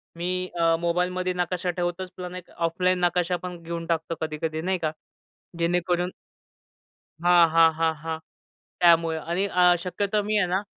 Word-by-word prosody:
मी 180 +2 -2
अ, 165 0 +4
मोबाईलमध्ये 180 +1 0
नकाशा 180 0 -2
ठेवतोच. 175 +1 -3
पण 180 0 -6
एक 180 - -9
ऑफलाईन 180 +2 +1
नकाशा 180 0 +1
पण 180 -2 -6
घेऊन 165 0 -5
टाकतो 165 0 -1
कधी-कधी, 155 0 -3
नाही 185 +2 0
का? 155 -2 -1 0.7
जेणेकरून 175 +1 +1 1.1
हां, 175 -1 +6
हां, 165 0 +6
हां, 160 -1 +2
हां 160 -1 -3 0.6
त्यामुळे 165 -2 +4
आणि 175 +5 -1
अ, 180 -2 +4
शक्यतो 205 +3 -1
मी 215 +1 -1
आहे 180 - +2
ना 190 +3 0
175 Hz, 150 wpm, -25 LUFS, 165-180 Hz, 1.1 s, हां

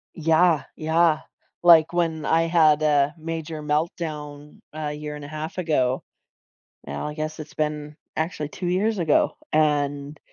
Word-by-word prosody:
Yeah, 165 0 +3
yeah. 160 0 +2 0.4
Like, 170 -2 +6
when 165 -3 0
I 165 +2 +3
had 160 -3 +4
a 145 -1 +3
major 160 -1 -5
meltdown 150 -1 -3
a 150 -1 -4
year 150 0 -6
and 145 -1 -8
a - - -8
half 155 +3 -6
ago. 135 -7 0 0.8
Now, 70 - -4
I 150 - -5
guess 155 +1 -5
it's 155 -1 -9
been 150 -1 -3 0.2
actually 160 -2 -2
2 180 - -5
years 205 +5 +1
ago, 160 -5 +2
and 145 -1 0
155 Hz, 145 wpm, -24 LUFS, 150-165 Hz, 0.8 s, Like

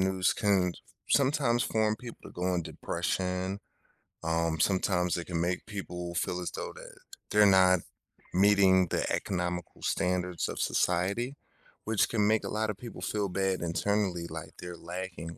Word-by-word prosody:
news 95 -1 +2
can 100 -4 +2
s - - -14 0.4
sometimes 130 -4 +2
form 110 -1 +1
people 120 +1 -9
to - - -9
go 90 +1 -1
in 85 - 0
depression. 95 +4 -2 0.6
Um, 80 0 0
sometimes 90 -1 +2
it 85 - -4
can 85 -2 -2
make 90 +1 -1
people 90 -4 -5
feel 90 +1 -1
as 90 - -2
though - - -5
that - - -11 0.3
they're 105 0 +6
not 95 -2 +6 0.5
meeting 95 -1 +5
the - - 0
economical 90 -2 -2
standards 90 -1 0
of - - -5
society, 100 +10 +1 0.5
which 110 -1 +2
can 105 -3 +2
make 110 0 +3
a - - -4
lotta 105 -1 -1
people 115 +3 -9
feel 105 -2 -1
bad 95 0 0
internally, 85 +2 0
like 80 -1 -7
they're 90 0 -6
lacking 85 -2 -6
95 Hz, 155 wpm, -30 LUFS, 90-105 Hz, 0.6 s, they're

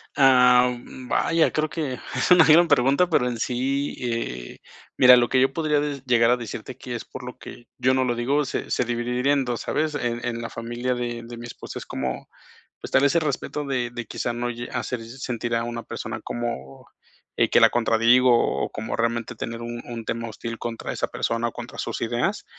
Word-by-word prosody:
Ah, 125 -2 +6
u - - -8
mm, 125 +1 -11
vaya, 165 -1 +2
creo 155 0 0
que 135 -3 -3 0.2
es - - 0
una 175 -3 +8
gran 165 +2 +6
pregunta, 140 +4 +3
pero 125 -6 +2
en 120 -2 -3
sí 135 +4 -1
eh, 115 - -4 0.4
mira, 125 0 +9
lo 120 -1 +2
que 130 - +3
yo 135 +1 +3
podría 150 -2 +1
de 145 -2 -3
llegar 120 -1 +4
a 125 - +3
decirte 120 +2 -7
que 125 -2 -6
es 115 - -6
por 125 - -9
lo 125 0 -8
que 120 - -12
yo 130 +1 +2
no 130 0 +2
lo 120 -1 0
digo, 140 +5 +1
se - - -4
se - - +2
dividiría 125 +3 0
en 135 -2 +1
2, 120 -1 -3
¿sabes? 155 0 -1
En 120 -3 -2
en 120 -1 -3
la 115 - -5
familia 120 +2 -3
de 120 -1 -3
de 120 0 -9
mi 120 - -8
esposa 120 - -8
es - - -9
como, 65 -1 -4 0.5
pues, - - -8
tal 140 - +4
ese 165 +4 +3
respeto 150 0 -3
de 125 -3 -1
de, 120 -1 -6
quizá, 120 - -3
no 120 +1 -2
lle 120 0 -6
hacer 125 - -3
se 120 +4 -11
sentir 120 -1 -3
a 115 0 0
una 120 0 -5
persona - - -6
como, 70 - -5 0.5
eh, - - +3
que - - +5
la - - +7
contradigo, 120 +2 +4 0.3
o - - -4
como 110 0 -4
realmente 115 +1 -1
tener 115 +1 -5
un 120 0 -5
un 115 -2 -6
tema 115 0 -3
hostil 115 +1 -6
contra 115 -1 -5
esa - - -1
persona 115 +1 -1
o - - -8
contra 120 +2 -9
sus - - -3
ideas. 120 - -1
120 Hz, 220 wpm, -24 LUFS, 115-135 Hz, 0.5 s, mira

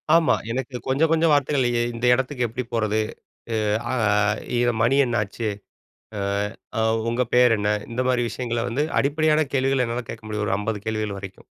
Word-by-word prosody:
ஆமா. 165 -2 +4 0.2
எனக்கு 130 +1 -4
கொஞ்சம், 140 +5 +2
கொஞ்சம் 165 0 +3
வார்த்தைகள் 145 -2 +2
எ - - +2
இந்த 115 +1 -3
இடத்துக்கு 125 0 0
எப்பிடி 120 +3 -5
போறது? 110 -2 +1 0.9
அ - - -1 0.7
இது 120 0 +2
மணி 130 +4 +3
என்னாச்சு? 115 -1 -2 0.7
அ - - -2 0.6
அ - - +2 0.3
உங்க 120 +2 +1
பேர் 125 -2 +5
என்ன? 105 0 0 0.2
இந்தமாரி 125 +1 +1
விஷயங்கள 120 0 -2
வந்து 130 +6 0 0.2
அடிப்படையான 155 +2 +2
கேள்விகள் 135 -1 +2
என்னால 120 +1 -3
கேட்க 115 - -8
முடியும். 105 -1 -2
ஒரு - - +1
50 105 0 -3
கேள்விகள் 110 -2 -2
வரைக்கும். 95 -1 -10
120 Hz, 160 wpm, -23 LUFS, 110-135 Hz, 0.9 s, பேர்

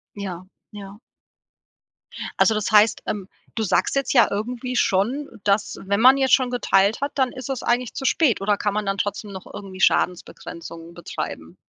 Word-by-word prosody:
Ja, 185 -3 -6 0.3
ja. 200 0 -10 1.4
Also 220 - +4
das 215 0 -1
heißt 215 0 +4
ähm, 195 -3 -4 0.3
du 225 - -2
sagst 190 -3 +1
jetzt 275 -1 0
ja 240 - +6
irgendwie 245 +4 -3
schon, 240 +8 +1 0.2
dass 205 +1 0
„wenn 200 +2 0
man 260 +3 +7
jetzt 265 -2 +4
schon 255 -2 +1
geteilt 205 -3 +2
hat, 280 +1 -2
dann 260 -3 +1
ist 255 -1 -8
es 265 - -3
eigentlich 240 0 0
zu - - -5
spät“, 265 - +2
oder 205 +1 +1
kann 205 0 -2
man 210 -1 -2
dann 195 0 -1
trotzdem 205 0 -3
noch 190 -1 -9
irgendwie 190 -2 -9
Schadensbegrenzung 170 -2 -1
betreiben? 85 - -7
210 Hz, 175 wpm, -22 LUFS, 195-250 Hz, 1.4 s, man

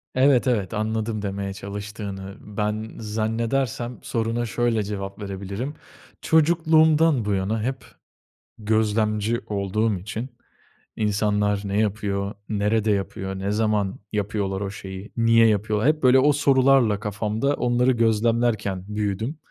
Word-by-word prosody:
Evet, 130 0 +4
evet, 110 -6 0
anladım 110 0 -2
demeye 100 -1 -3
çalıştığını. 100 -1 -7
Ben 105 +1 -3
zannedersem 115 +3 -2
soruna 115 +1 -1
şöyle 115 0 0
cevap 100 0 -5
verebilirim. 100 +7 -5 0.5
Çocukluğumdan 160 -4 +4
bu 105 - 0
yana 100 +3 -1
hep 130 +2 -3 0.7
gözlemci 110 +1 +1
olduğum 105 +1 0
için, 110 +7 -5 0.7
insanlar 105 -1 +1
ne 100 +1 0
yapıyor, 100 -1 -1 0.2
nerede 105 +1 +1
yapıyor, 95 -1 -3
ne 100 +1 -2
zaman 105 -2 0
yapıyorlar 100 -2 -2
o 100 -1 -3
şeyi, 95 0 -8
niye 115 0 +5
yapıyorlar; 105 +3 +1
hep, 155 -1 0
böyle, 130 +1 +6
o 145 +2 +4
sorularla 135 -6 +4
kafamda 105 +6 -1
onları 125 -1 +2
gözlemlerken 115 -4 +1
büyüdüm 105 +7 -2
110 Hz, 115 wpm, -24 LUFS, 100-120 Hz, 0.7 s, böyle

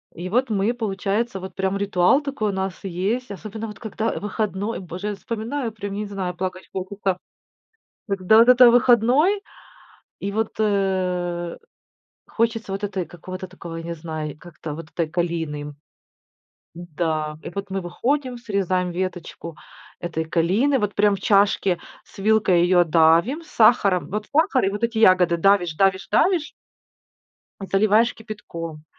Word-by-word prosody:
И 175 +2 -5
вот 250 +5 +1
мы 210 +3 +1
получается, 210 0 -2
вот 190 0 -8
прям 190 0 -1
ритуал 200 +6 +3
такой 280 -7 -2
у - - -4
нас 190 -1 -4
есть, 195 +7 -2
особенно 215 +3 -6
вот 210 -2 -10
когда, 220 0 -3
э, - - -3
выходной. 210 +1 -3
Боже, 185 +2 -6
я 210 - -2
вспоминаю 230 +4 -4
прям 205 -2 -6
я 205 - -3
не 210 - -3
знаю, 190 -3 -4
плакать 185 +1 -5
хочется. 190 0 -2 0.9
Когда 195 +2 +4
вот 230 +2 +6
это 250 -1 +8
выходной, 255 - +4 0.8
и 200 - -3
вот, 220 +1 -1
э, 185 -4 0 0.7
хочется 225 -3 -1
вот, 195 +1 -4
этой 190 -3 -2
какого-то 185 +3 -8
такого, 170 -2 -9
я 165 - -5
не 170 0 -5
знаю, 155 -2 -6
как-то 160 -2 -9
вот 165 +1 -8
этой 165 -2 -2
калины 160 -4 -3 1.0
Да. 155 -2 -3
И - - -7
вот 200 +2 -5
мы 195 0 -2
выходим, 250 +9 -2
срезаем 190 -5 -1
веточку 175 -2 -5 0.5
этой 160 -2 -3
калины, 195 - +2
вот 210 -1 -1
прям 205 -1 +3
в - - -9
чашке 195 -3 +3 0.2
с - - -20
вилкой 200 -4 +3
её 175 0 +5
давим 170 - +3
сахаром. 215 - +3
Вот 210 +2 -3
сахар 305 - +3
и - - +2
вот 205 +3 -5
эти 230 -1 0
ягоды 185 -5 +5
давишь, 180 -2 +3
давишь, 190 +1 +2
давишь 345 -5 +2 1.1
заливаешь 210 +4 +3
кипятком. 165 -8 -8
195 Hz, 150 wpm, -23 LUFS, 175-220 Hz, 1.1 s, это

